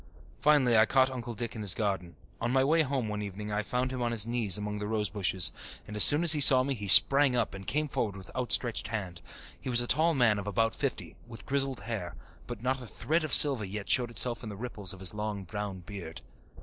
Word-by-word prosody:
Finally 140 Hz, -5 st, +2 dB
I 110 Hz, 0 st, +4 dB
caught 130 Hz, +1 st, +1 dB
Uncle 120 Hz, -2 st, -8 dB
Dick 115 Hz, +1 st, -6 dB
in 110 Hz, -, -7 dB
his 100 Hz, -5 st, +1 dB
garden. 95 Hz, -5 st, -4 dB, 0.3 s
On 115 Hz, -, -2 dB
my 130 Hz, 0 st, +1 dB
way 160 Hz, +4 st, +2 dB
home 135 Hz, -5 st, -3 dB
one 105 Hz, 0 st, -5 dB
evening 105 Hz, +1 st, -8 dB
I 105 Hz, 0 st, -2 dB
found 125 Hz, +4 st, -4 dB
him 130 Hz, -1 st, -6 dB
on 120 Hz, -1 st, -2 dB
his 110 Hz, -2 st, -1 dB
knees 115 Hz, -5 st, -1 dB
among 105 Hz, 0 st, -6 dB
the 105 Hz, -, -6 dB
rosebushes, 105 Hz, -4 st, -1 dB, 0.3 s
and 105 Hz, -, -10 dB
as 105 Hz, -, +8 dB
soon 150 Hz, +3 st, +8 dB
as 170 Hz, -, +8 dB
he 150 Hz, -2 st, +6 dB
saw 130 Hz, -2 st, +7 dB
me 140 Hz, +1 st, -3 dB
he 105 Hz, -5 st, -8 dB
sprang 135 Hz, +7 st, +7 dB
up 120 Hz, -, -2 dB
and 95 Hz, -1 st, -11 dB
came 150 Hz, +8 st, -2 dB
forward 105 Hz, -7 st, -4 dB
with 95 Hz, -1 st, -12 dB
outstretched 120 Hz, -2 st, -2 dB
hand. 95 Hz, -7 st, -7 dB, 0.4 s
He -, -, -8 dB
was 120 Hz, -1 st, +2 dB
a 120 Hz, -, +1 dB
tall 160 Hz, +6 st, +1 dB
man 115 Hz, -6 st, +1 dB
of 100 Hz, -, -8 dB
about 115 Hz, +2 st, -1 dB
fifty, -, -, -5 dB
with 115 Hz, -3 st, -11 dB
grizzled 135 Hz, -2 st, -3 dB
hair, 100 Hz, -7 st, -7 dB, 0.3 s
but 120 Hz, -2 st, -9 dB
not 130 Hz, +1 st, -2 dB
a 125 Hz, -, -10 dB
thread 160 Hz, +8 st, -3 dB
of 155 Hz, -, -5 dB
silver 135 Hz, -6 st, +5 dB
yet 100 Hz, +1 st, -7 dB
showed 120 Hz, -2 st, +1 dB
itself 120 Hz, 0 st, +1 dB
in 115 Hz, -, -9 dB
the 100 Hz, -, -9 dB
ripples 105 Hz, -5 st, -4 dB
of 95 Hz, -, -8 dB
his 95 Hz, 0 st, -1 dB
long 105 Hz, -1 st, -6 dB
brown 100 Hz, -1 st, -7 dB
beard. 85 Hz, -4 st, -10 dB
115 Hz, 240 wpm, -28 LUFS, 105-130 Hz, 0.4 s, as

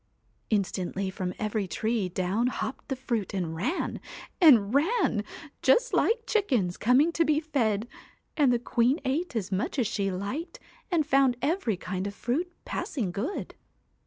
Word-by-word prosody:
Instantly 195 Hz, -2 st, -1 dB
from 185 Hz, -1 st, -3 dB
every 215 Hz, -2 st, -1 dB
tree 215 Hz, +2 st, -1 dB
down 190 Hz, +6 st, 0 dB
hopped 255 Hz, -, -4 dB
the 270 Hz, -, -2 dB
fruit 235 Hz, -6 st, -3 dB
and 170 Hz, -4 st, -2 dB
ran 255 Hz, -, -2 dB, 0.4 s
and 235 Hz, -, +7 dB
ran 315 Hz, -, +2 dB, 0.4 s
just -, -, +3 dB
like 460 Hz, 0 st, +2 dB
chickens 255 Hz, -, +1 dB
coming 260 Hz, +8 st, +4 dB
to 330 Hz, -, +2 dB
be 305 Hz, -1 st, +2 dB
fed, 235 Hz, -9 st, 0 dB, 0.5 s
and 285 Hz, -5 st, +4 dB
the 240 Hz, -, +3 dB
queen 245 Hz, +4 st, +1 dB
ate 285 Hz, +3 st, -1 dB
as 205 Hz, -3 st, -2 dB
much 195 Hz, +9 st, -1 dB
as 250 Hz, -, +2 dB
she 200 Hz, -2 st, -1 dB
liked, 200 Hz, -, -4 dB, 0.3 s
and 335 Hz, -5 st, +2 dB
found 270 Hz, -3 st, +3 dB
every 285 Hz, -, 0 dB
kind 185 Hz, +2 st, -4 dB
of 200 Hz, -, -6 dB
fruit 315 Hz, +12 st, -2 dB
passing 220 Hz, -, -3 dB
good. 230 Hz, -, -4 dB
240 Hz, 155 wpm, -28 LUFS, 200-300 Hz, 0.5 s, and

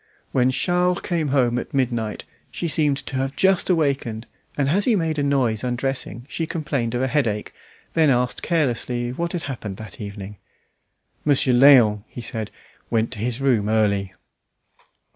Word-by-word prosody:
When 125 Hz, -1 st, +3 dB
Charles 180 Hz, +6 st, +1 dB
came 165 Hz, -4 st, -1 dB
home 125 Hz, -3 st, +2 dB
at -, -, -7 dB
midnight, 120 Hz, -5 st, -1 dB, 0.2 s
she 170 Hz, -, -4 dB
seemed 150 Hz, -3 st, +1 dB
to 135 Hz, -, -3 dB
have 135 Hz, +1 st, -2 dB
just 190 Hz, -1 st, +2 dB
awakened, 140 Hz, -9 st, 0 dB, 0.3 s
and 140 Hz, -2 st, +1 dB
as 195 Hz, +6 st, +2 dB
he 240 Hz, -, +3 dB
made 160 Hz, -5 st, 0 dB
a -, -, +1 dB
noise 130 Hz, -6 st, +1 dB
undressing, 125 Hz, -1 st, -3 dB
she 165 Hz, +1 st, -3 dB
complained 140 Hz, -8 st, -2 dB
of 125 Hz, -, 0 dB
a -, -, +2 dB
headache, 120 Hz, -7 st, -1 dB, 0.4 s
then 160 Hz, -2 st, +4 dB
asked 125 Hz, -1 st, +1 dB
carelessly 125 Hz, -6 st, 0 dB
what 170 Hz, +6 st, -3 dB
had 175 Hz, -, -3 dB
happened 110 Hz, -8 st, -5 dB
that 110 Hz, +1 st, -9 dB
evening. 100 Hz, 0 st, -7 dB, 0.9 s
"Monsieur 140 Hz, -3 st, +3 dB
Léon," 120 Hz, -6 st, +6 dB
he 120 Hz, -, -8 dB
said, 110 Hz, -2 st, -4 dB, 0.4 s
"went 115 Hz, -1 st, +1 dB
to -, -, -6 dB
his 120 Hz, +3 st, -2 dB
room 115 Hz, -7 st, +2 dB
early." 100 Hz, -3 st, +1 dB
130 Hz, 160 wpm, -22 LUFS, 115-150 Hz, 0.9 s, Léon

